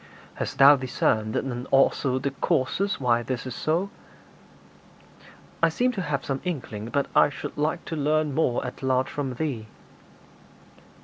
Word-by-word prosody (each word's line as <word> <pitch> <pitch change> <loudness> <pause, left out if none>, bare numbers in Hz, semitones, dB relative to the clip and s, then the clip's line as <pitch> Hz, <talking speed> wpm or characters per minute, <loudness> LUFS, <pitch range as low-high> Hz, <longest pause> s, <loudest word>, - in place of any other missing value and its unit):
'Hast - - -5
thou 140 +2 +9
discerned 110 -4 0 0.3
also 135 -1 +3
the 135 +1 -2
causes 165 +7 0
why 120 -3 +2
this 125 +1 -4
is 130 - -5
so?' 170 - -1 1.7
'I 165 - +5
seem 245 +10 +1
to 205 -6 -4
have 150 -5 -2
some 135 -1 -2
inkling, 125 - -4
but 140 +2 0
I - - +6
should 140 - -7
like 155 +4 -1
to 165 - -4
learn 150 0 +1
more 130 -5 +1
at 125 - -7
large 130 -1 +1
from 135 -3 -3
thee.' 125 -6 -3
140 Hz, 145 wpm, -25 LUFS, 130-155 Hz, 1.7 s, thou